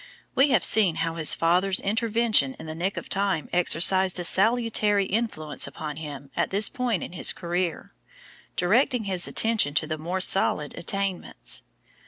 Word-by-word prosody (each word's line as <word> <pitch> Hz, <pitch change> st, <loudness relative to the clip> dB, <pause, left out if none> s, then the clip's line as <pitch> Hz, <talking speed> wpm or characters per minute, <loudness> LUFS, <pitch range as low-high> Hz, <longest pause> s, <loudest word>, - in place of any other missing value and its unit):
We 275 Hz, +2 st, +3 dB
have 240 Hz, -9 st, +2 dB
seen 195 Hz, -7 st, +3 dB
how 165 Hz, -3 st, -3 dB
his 160 Hz, -2 st, +4 dB
father's 180 Hz, +3 st, +1 dB
intervention 220 Hz, -, 0 dB
in -, -, -11 dB
the 155 Hz, -, -7 dB
nick 180 Hz, +5 st, -4 dB
of -, -, -7 dB
time 195 Hz, -5 st, -2 dB
exercised 180 Hz, +2 st, +4 dB
a -, -, -3 dB
salutary 210 Hz, +1 st, +2 dB
influence 190 Hz, -9 st, -2 dB
upon 150 Hz, -2 st, -8 dB
him 145 Hz, -3 st, -9 dB
at -, -, -1 dB
this 200 Hz, +2 st, +3 dB
point 245 Hz, -, -3 dB
in -, -, -8 dB
his 180 Hz, -, +1 dB
career, 175 Hz, -, -4 dB, 0.6 s
directing 235 Hz, +6 st, +1 dB
his 185 Hz, -3 st, +2 dB
attention 220 Hz, -11 st, +1 dB
to 155 Hz, -, 0 dB
the 155 Hz, 0 st, -5 dB
more 175 Hz, +4 st, -4 dB
solid 170 Hz, -5 st, +1 dB
attainments. 190 Hz, -, -3 dB
185 Hz, 160 wpm, -24 LUFS, 160-210 Hz, 0.6 s, his